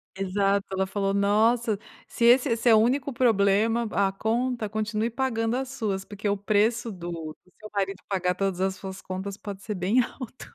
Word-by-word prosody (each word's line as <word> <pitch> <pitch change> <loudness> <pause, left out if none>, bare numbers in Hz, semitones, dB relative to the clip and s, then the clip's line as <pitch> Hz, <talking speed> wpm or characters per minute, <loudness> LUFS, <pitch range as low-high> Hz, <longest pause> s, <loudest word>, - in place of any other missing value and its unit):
Exato, 195 +1 0
ela 190 0 0
falou: 195 0 -1
"Nossa, 215 +2 +2 0.3
se 235 - -1
esse 245 +3 +6
esse 230 +1 +2
é 225 - +8
o - - +6
único 260 +5 +2
problema 225 -1 +2
a 195 -1 +2
conta, 230 +2 -1
continue 215 +1 -1
pagando 230 -2 -1
as 265 0 -3
suas, 200 -7 -3
porque 205 0 -4
o 200 - +1
preço 220 +4 +1
do 175 -3 -6 0.3
do 180 - -27
seu 215 - -10
marido 195 -1 -1
pagar 180 -2 0
todas 190 -1 -1
as 190 0 0
suas 190 0 -8
contas 190 +1 -5
pode 200 -2 -8
ser 210 - -3
bem 200 +6 +2
alto". 250 0 -8
210 Hz, 190 wpm, -26 LUFS, 195-230 Hz, 0.3 s, é